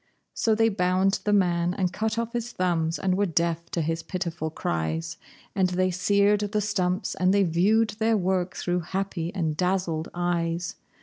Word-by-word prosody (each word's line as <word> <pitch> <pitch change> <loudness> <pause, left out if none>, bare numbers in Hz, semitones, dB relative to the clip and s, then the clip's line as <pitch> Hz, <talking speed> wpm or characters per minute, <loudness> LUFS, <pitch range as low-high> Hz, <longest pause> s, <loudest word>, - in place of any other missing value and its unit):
So 220 -1 +2
they 225 +1 +3
bound 190 0 +1
the 210 - +2
man 175 -3 +2
and 185 -3 -1
cut 220 +3 -1
off 230 +1 -2
his 240 0 -3
thumbs, 165 -2 0
and 185 -1 0
were 200 +1 +1
deaf 170 0 -1
to 170 - -1
his 165 +1 -1
pitiful 170 -4 -3
cries, 80 - -3 0.4
And 190 -2 +2
they 185 +1 +1
seared 200 +3 +3
the 210 +1 -1
stumps, 195 -2 -1
and 185 0 +2
they 200 0 +4
viewed 200 +6 +3
their 225 0 +3
work 185 -1 0
through 180 0 -1
happy 180 -1 -3
and 160 -5 -1
dazzled 180 -2 -1
eyes. 175 -1 -1
180 Hz, 175 wpm, -26 LUFS, 170-200 Hz, 0.4 s, they